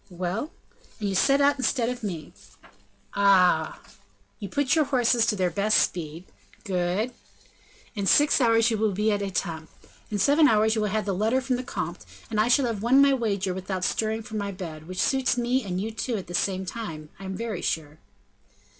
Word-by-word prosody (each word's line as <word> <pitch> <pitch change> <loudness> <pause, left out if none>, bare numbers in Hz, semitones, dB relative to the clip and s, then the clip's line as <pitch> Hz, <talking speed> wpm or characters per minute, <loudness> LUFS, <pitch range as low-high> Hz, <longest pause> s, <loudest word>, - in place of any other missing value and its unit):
"Well?" 185 - -3 0.5
"And 205 -2 -2
you - - -2
set 275 +9 +3
out 285 0 +3
instead 255 -2 +1
of 250 0 -4
me." 175 -8 -6 0.8
"Ah!" 185 -5 +3 0.6
"You 200 - -6
put 285 - +1
your 315 -2 +3
horses 245 -4 +2
to 210 - +1
their 185 -3 0
best 205 +5 +2
speed." 165 -1 -1 0.4
"Good!" 190 +4 -1 0.8
"In 200 -3 -3
six 290 +3 +4
hours 230 -1 +4
you 220 - -1
will 215 -2 +1
be 210 +3 +1
at 205 -1 0
Etampes; 170 -5 -3 0.4
in 210 - -2
seven 290 +9 +4
hours 220 -2 +3
you 220 - 0
have 210 +1 -1
the 200 - -1
letter 220 +7 +1
from 260 -1 -1
the 250 - -4
comte, - - -5 0.3
and 215 - 0
I 215 - +3
shall 260 +2 +4
have 225 -4 -3
won 245 +5 +4
my 280 0 +6
wager 200 -7 -1
without 185 0 -4
stirring 220 +3 -1
from 215 -1 -5
my 200 0 -3
bed, 165 -5 -8
which 185 +1 -6
suits 265 +1 +1
me 245 +2 +1
and 185 -2 -3
you 215 +3 -3
too, 225 +1 -3
at 190 - -6
the 175 - -9
same 190 +1 -1
time, 165 -8 -6
I 195 - -9
am 190 0 -4
very 220 -4 -4
sure." 155 -1 -3
210 Hz, 200 wpm, -26 LUFS, 185-240 Hz, 0.8 s, my